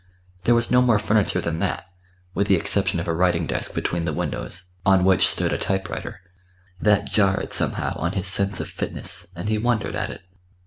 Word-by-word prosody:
There 120 - +5
was 115 0 0
no 125 0 +6
more 120 -4 +4
furniture 105 -1 +1
than 85 -1 -2
that, 100 0 -1 0.5
with 100 - 0
the 100 - +5
exception 95 0 0
of 85 - -4
a 85 - +1
writing 85 -1 +2
desk 65 -3 -3
between 85 -1 -1
the 80 - -1
windows, 85 +4 -4 0.2
on 95 -1 +4
which 95 -1 +6
stood - - 0
a - - -1
typewriter. 95 -1 -3 0.6
That 105 -2 +2
jarred 95 -3 +1
somehow - - 0
on 85 +2 -1
his 95 -2 -2
sense 100 +1 +1
of - - -3
fitness, 85 - -4
and 85 +4 -5
he 110 0 +1
wondered 120 -1 0
at - - -2
it. - - -8
95 Hz, 195 wpm, -23 LUFS, 85-105 Hz, 0.6 s, no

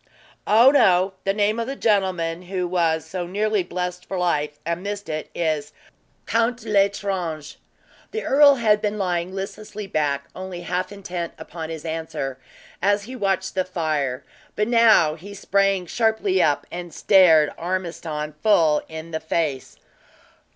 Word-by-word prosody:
"Oh, 230 +5 +7
no! 190 -8 +4
The 195 - +3
name 210 +2 +1
of 230 - -2
the 270 - -4
gentleman 185 -7 0
who 180 0 -3
was 165 -3 +1
so 175 +1 -5
nearly 210 +2 0
blessed 180 0 -4
for 190 - -4
life, 150 -4 0
and 170 +1 -2
missed 200 -2 -5
it, 155 0 -4
is 155 -3 -1 0.5
Count 230 +1 0
L'Estrange!" 195 -7 -1 0.5
The 445 - -4
earl 285 0 +6
had 215 -4 +2
been 210 0 -1
lying 180 -2 -1
listlessly 205 +2 -6
back, 145 -6 -1
only 185 -1 -6
half 180 +2 -2
intent 180 -4 -5
upon 160 0 -7
his 160 -1 -7
answer, 160 -5 -4 0.4
as 205 +1 +2
he 250 +5 -8
watched 195 -4 -1
the 185 - +1
fire; 155 -7 -2 0.3
but 210 - 0
now 230 -9 +5
he 195 +6 -10
sprang 195 -1 +1
sharply 220 -2 +1
up, 150 -3 +2
and 175 0 -6
stared 165 -7 +5
Ormiston 165 -4 -4
full 165 -8 +4
in 160 +1 -8
the 160 - -2
face. 155 -5 -2
180 Hz, 150 wpm, -23 LUFS, 160-205 Hz, 0.5 s, Oh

